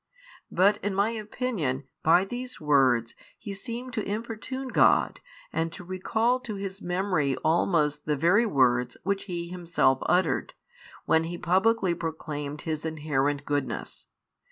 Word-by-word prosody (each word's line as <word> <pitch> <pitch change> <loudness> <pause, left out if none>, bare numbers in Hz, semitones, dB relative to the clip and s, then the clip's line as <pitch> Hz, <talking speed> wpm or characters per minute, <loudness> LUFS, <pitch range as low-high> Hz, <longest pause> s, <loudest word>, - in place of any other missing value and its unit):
But 200 +3 +4
in 205 -1 -3
my 200 +3 +2
opinion 215 - -2 0.2
by 175 +4 +5
these 250 +4 -6
words 130 -6 +3 0.2
he 205 -3 -7
seemed 235 +5 -6
to 220 -3 -1
importune 230 +5 -4
God - - +3 0.3
and 165 0 -1
to 180 - -9
recall 220 +7 0
to 235 -5 -6
His 195 0 -6
memory 180 -6 0
almost 155 -3 +2
the 150 - +2
very 190 +10 +4
words 125 - +2
which 200 0 -1
He 170 -3 -4
Himself 170 -7 +1
uttered, 185 +1 +1 0.5
when 160 0 +3
He 175 +1 -5
publicly 190 +2 +2
proclaimed 150 -3 -5
His 155 -1 -3
inherent 145 -3 -1
goodness. 145 -2 -3
175 Hz, 135 wpm, -27 LUFS, 150-205 Hz, 0.5 s, by